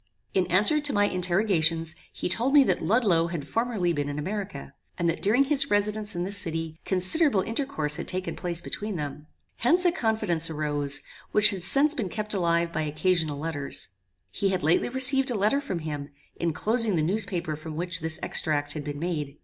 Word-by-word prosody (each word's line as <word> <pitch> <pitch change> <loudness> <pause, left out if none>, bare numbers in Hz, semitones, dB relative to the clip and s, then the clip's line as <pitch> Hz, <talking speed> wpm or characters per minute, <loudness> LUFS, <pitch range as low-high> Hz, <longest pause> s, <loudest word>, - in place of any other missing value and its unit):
In 185 -2 +1
answer 205 - +4
to 290 -1 +1
my 205 0 +3
interrogations, 175 -4 +1 0.2
he - - -4
told 240 +10 0
me 285 - +8
that - - 0
Ludloe 180 -3 +2
had 165 -4 -6
formerly 225 -6 -1
been 145 -2 -3
in 145 - -5
America, 195 +5 -6 0.2
and 170 - -1
that 165 - -1
during 225 +7 +3
his 275 -1 +2
residence 210 0 0
in 175 - -2
this 200 +2 +1
city, 165 -2 -4
considerable 195 - +4
intercourse 225 - -1
had - - -6
taken 185 +1 -4
place 175 -2 -3
between 210 +3 -5
them. 150 -1 -6 0.3
Hence 345 +10 +2
a 350 - +4
confidence 220 - +1
arose, 145 -2 -2 0.3
which 210 0 +6
has 185 -3 -2
since 280 +9 +5
been 220 -10 -4
kept 215 +1 -5
alive 170 -2 0
by - - -1
occasional 155 0 0
letters. 145 -6 -3 0.4
He 200 -2 -1
had 185 -1 -2
lately 160 +8 +2
received 260 +1 +6
a 245 - -2
letter 215 +8 +1
from 195 -11 -4
him, 150 -3 -6 0.3
enclosing 215 +6 +1
the 155 - 0
newspaper 175 -3 -1
from 155 +1 -9
which 175 +1 -3
this 160 -1 0
extract 145 -2 0
had 150 - -6
been 145 0 -6
made. 150 -3 -4
180 Hz, 190 wpm, -26 LUFS, 160-215 Hz, 0.4 s, me